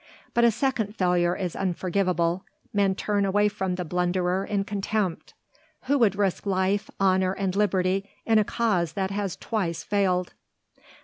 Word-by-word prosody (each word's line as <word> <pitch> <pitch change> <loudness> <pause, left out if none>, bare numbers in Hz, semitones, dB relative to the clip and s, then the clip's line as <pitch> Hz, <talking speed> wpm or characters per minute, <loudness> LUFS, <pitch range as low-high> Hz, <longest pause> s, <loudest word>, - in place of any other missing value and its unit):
But 235 - +3
a 235 - +7
second 230 -3 -1
failure 180 -2 +2
is 180 -4 -3
unforgivable, 180 -1 0 0.3
men 200 -2 +2
turn 205 0 0
away 205 +2 +3
from 190 -2 -2
the 180 -1 -4
blunderer 180 +2 0
in 200 -1 -1
contempt. 200 -2 -2 0.5
Who 280 +2 +1
would 210 -5 +4
risk 200 0 -1
life, 195 +2 +1
honour 190 -1 +3
and 195 -1 -2
liberty 195 -1 +1 0.2
in 225 -1 +4
a - - +4
cause 200 -8 0
that 190 +1 -2
has 200 -2 -2
twice 185 -8 -2
failed? 185 -3 0
195 Hz, 150 wpm, -26 LUFS, 180-205 Hz, 0.5 s, a